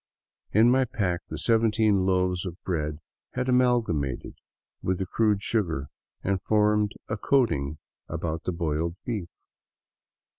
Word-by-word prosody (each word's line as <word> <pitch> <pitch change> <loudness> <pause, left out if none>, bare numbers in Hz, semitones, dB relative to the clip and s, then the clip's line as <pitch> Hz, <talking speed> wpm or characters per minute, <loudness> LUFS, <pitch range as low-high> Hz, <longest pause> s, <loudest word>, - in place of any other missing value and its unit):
In 115 +3 +5
my 130 +1 +4
pack 90 -7 -1
the - - -4
seventeen 110 -4 +3
loaves 90 -1 +1
of 90 -3 -6
bread 75 -4 -2 0.4
had 125 0 -1
amalgamated 120 - +1 0.5
with 95 0 0
the 95 - -2
crude 105 0 +1
sugar 85 -11 0 0.3
and 95 -1 0
formed 105 0 +2
a 110 - -2
coating 80 - +1 0.3
about 80 0 -3
the - - 0
boiled 85 -1 -1
beef. 105 -8 -3
95 Hz, 125 wpm, -27 LUFS, 85-110 Hz, 0.5 s, In